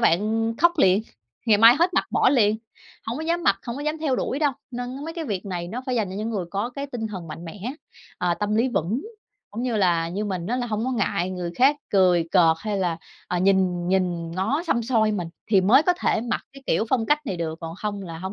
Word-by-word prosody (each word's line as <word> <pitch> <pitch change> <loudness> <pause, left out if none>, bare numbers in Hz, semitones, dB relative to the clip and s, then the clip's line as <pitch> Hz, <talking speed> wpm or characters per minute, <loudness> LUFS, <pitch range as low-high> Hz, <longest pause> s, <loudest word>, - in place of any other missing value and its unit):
bạn, 175 -6 +4
ừm, 225 +2 -1
khóc 345 +5 +4
liền, 195 -3 +4 0.4
ngày 215 -3 +5
mai 230 +2 +9
hết 350 +2 +2
mặc - - +3
bỏ - - +4
liền, 215 -6 +3 0.5
hổng 230 +4 -3
có 315 - -4
dám 340 +1 0
mặc, 195 -8 +3
hổng 235 0 -4
có 285 - -5
dám 305 +1 -2
theo 295 -5 0
đuổi 265 - -2
đâu. 295 -2 +2 0.2
Nên 250 +3 -5
mấy 325 +1 -6
cái 335 -2 -4
việc 205 -7 -4
này 175 -3 -4
nó 245 +7 -5
phải 255 - -1
dành 215 -6 0
cho - - -6
những 215 +2 -3
người 200 -5 -2
có 200 +5 -2
cái 280 +3 -5
tinh 245 -5 -4
thần 185 -6 -7
mạnh 165 +2 -8
mẽ, 205 +8 -6 0.5
à, 175 -1 +1
tâm 210 +3 -1
lý 235 +4 +3
vững, 225 - -1 0.5
cũng 225 +4 -5
như 245 -3 -1
là 170 -4 +2
như 195 +5 -3
mình 185 -4 -3
á 240 +5 -1
là 245 -1 -2
hổng 220 -1 -2
có 260 - -1
ngại 190 -5 0
người 180 -2 -4
khác 275 +3 +5
cười 180 -4 +3
cợt 165 -4 +5
hay 210 -2 -2
là, 175 -3 0 0.3
à, 180 - 0
nhìn 185 -2 +2
nhìn 180 -3 0
ngó 215 - 0
xăm 235 -7 +1
soi 220 -3 +2
mình, 180 -5 -3 0.2
thì 200 -3 +4
mới 215 +10 +5
có 360 - +3
thể - - +1
mặc 235 +1 -2
cái 275 0 -13
kiểu - - +2
phong 235 -3 +1
cách 295 0 +1
này 190 - -2
được, 160 -1 -4
còn 165 -1 -6
không 205 0 -4
là 165 -3 -7
hổng 190 +3 -5
210 Hz, 260 wpm, -24 LUFS, 185-250 Hz, 0.5 s, mai